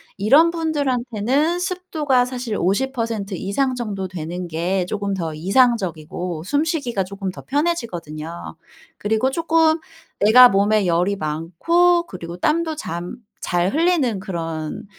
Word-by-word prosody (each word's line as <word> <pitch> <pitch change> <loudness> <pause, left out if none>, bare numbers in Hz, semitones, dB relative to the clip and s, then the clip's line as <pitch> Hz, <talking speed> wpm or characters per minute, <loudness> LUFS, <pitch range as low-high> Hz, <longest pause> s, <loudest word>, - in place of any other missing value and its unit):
이런 275 +12 +5
분들한테는 285 -1 0
습도가 335 -8 0
사실 250 -3 -4
50% 225 0 -1
이상 225 +9 -1
정도 205 -6 -4
되는 175 0 -5
게 175 +3 -1
쪼금 200 +1 -3
더 165 -4 -3
이상적이고 180 -4 0
숨 285 +8 +1
쉬기가 280 - -1
조금 195 0 -5
더 - - -10
편해지거든요. 175 - -3 0.4
그리고 220 +5 0
쪼끔 325 +1 +2 0.4
내가 250 +5 +9
몸에 205 0 +2
열이 180 +4 +1
많고 260 - +1
그리고 170 -1 -8
땀도 315 - 0
잠 175 - -5 0.2
잘 175 +1 0
흘리는 310 - +2
그런 165 0 -5
215 Hz, 260 characters per minute, -21 LUFS, 180-285 Hz, 0.4 s, 내가